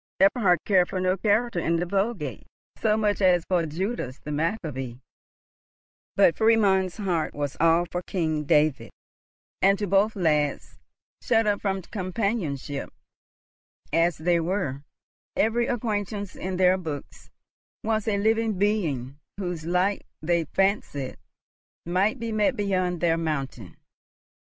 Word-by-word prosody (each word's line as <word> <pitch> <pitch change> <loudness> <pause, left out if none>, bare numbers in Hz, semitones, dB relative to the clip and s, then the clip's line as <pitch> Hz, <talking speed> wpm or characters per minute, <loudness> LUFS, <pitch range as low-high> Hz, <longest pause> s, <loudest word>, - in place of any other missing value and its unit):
Eberhard 195 -2 +4
cared 185 -3 +3
for 185 - -2
no 185 0 +2
character 215 +1 +1
in 165 0 +1
the 170 +1 0
Vulgate 195 - -2 0.3
so 215 -1 +1
much 210 -1 0
as 180 -3 +4
for 175 -3 +1
Judas 165 - -3
the 150 - -8
Maccabee; 150 - -2 1.2
but 195 -4 +5
Friedmund's 200 -5 +3
heart 180 -6 -1
was 145 -1 -3
all 165 +2 +4
for 175 +1 -4
King 160 -5 -2
David; 150 -5 +2 0.7
and 195 +1 +5
to 205 - -2
both 200 +3 +2
lads, 150 -6 0 0.4
shut 225 -2 +2
up 205 -1 +1
from 195 -2 -1
companionship 185 - -3 1.0
as 165 0 +3
they 170 +2 +2
were, 165 -6 -2 0.5
every 235 +2 +2
acquaintance 205 -4 -2
in 185 0 -4
their 185 0 +4
books 155 -5 -7 0.5
was 220 0 0
a 205 -2 +1
living 220 0 +1
being 155 - -1 0.2
whose 175 -5 -4
like 180 +3 0
they 170 -1 +1
fancied 170 -7 -1 0.7
might 190 +8 +1
be 230 0 -3
met 215 -1 +2
beyond 185 -4 -1
their 165 -1 +2
mountain. 135 - -4
185 Hz, 130 wpm, -26 LUFS, 160-205 Hz, 1.2 s, but